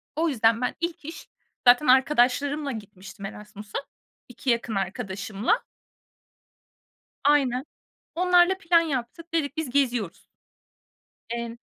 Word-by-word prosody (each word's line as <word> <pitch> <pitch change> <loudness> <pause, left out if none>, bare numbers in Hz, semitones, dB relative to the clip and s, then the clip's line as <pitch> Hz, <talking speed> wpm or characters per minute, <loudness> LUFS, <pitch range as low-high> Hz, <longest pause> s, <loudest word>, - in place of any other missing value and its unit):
O 325 +2 +1
yüzden 230 -3 +2
ben 250 - -1
ilk 340 -3 -3
iş, 320 - -9 0.4
zaten 245 +5 +6
arkadaşlarımla 275 +2 +3
gitmiştim 200 -3 -9
Erasmus'a, 210 +1 -8 0.5
2 250 +2 -5
yakın 235 -2 0
arkadaşımla. 195 - -2 1.6
Aynen. 270 -3 +2 0.5
Onlarla 360 +1 +4
plan 335 -2 +4
yaptık. 320 +2 -4
Dedik, 300 -2 -1
biz 315 -5 -3
geziyoruz. 245 -9 0 1.1
Emm 235 0 -4
250 Hz, 105 wpm, -25 LUFS, 225-300 Hz, 1.6 s, zaten